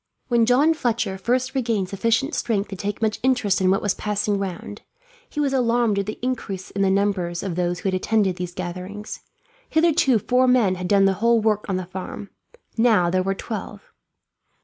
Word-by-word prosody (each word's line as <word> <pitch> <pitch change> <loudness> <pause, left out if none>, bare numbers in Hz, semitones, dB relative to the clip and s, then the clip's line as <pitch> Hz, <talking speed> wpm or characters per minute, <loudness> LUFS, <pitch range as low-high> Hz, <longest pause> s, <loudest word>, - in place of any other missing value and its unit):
When 235 -2 +3
John 280 +6 +4
Fletcher 230 -9 -1
first 250 +5 0
regained 230 -8 -1
sufficient 230 - 0
strength 210 -4 -1
to 195 - -6
take 205 +3 -4
much 215 -1 0
interest 245 -7 +1
in 185 - +3
what 195 - +1
was 205 - +1
passing 210 -1 -1
round, 195 +1 -6 0.5
he - - -6
was 280 -2 +1
alarmed 235 -4 +2
at 200 - -3
the 215 - -4
increase 215 -7 -4
in 195 - -3
the 195 - +3
numbers 190 -3 0
of 190 -3 -3
those 175 0 -1
who 195 - 0
attended 190 0 +1
these 180 -1 -5
gatherings. 185 +4 -6 0.5
Hitherto 315 -6 +3
four 250 +5 +2
men 245 -7 +4
had 180 -1 -4
done 195 0 +4
the 195 - +3
whole 235 0 +4
work 215 -1 0
of 190 - 0
the 185 - -4
farm; 190 +2 -7 0.5
now 215 -7 +4
there 185 0 +2
were 195 +1 -1
twelve. 210 -1 -7
205 Hz, 190 wpm, -23 LUFS, 190-235 Hz, 0.5 s, John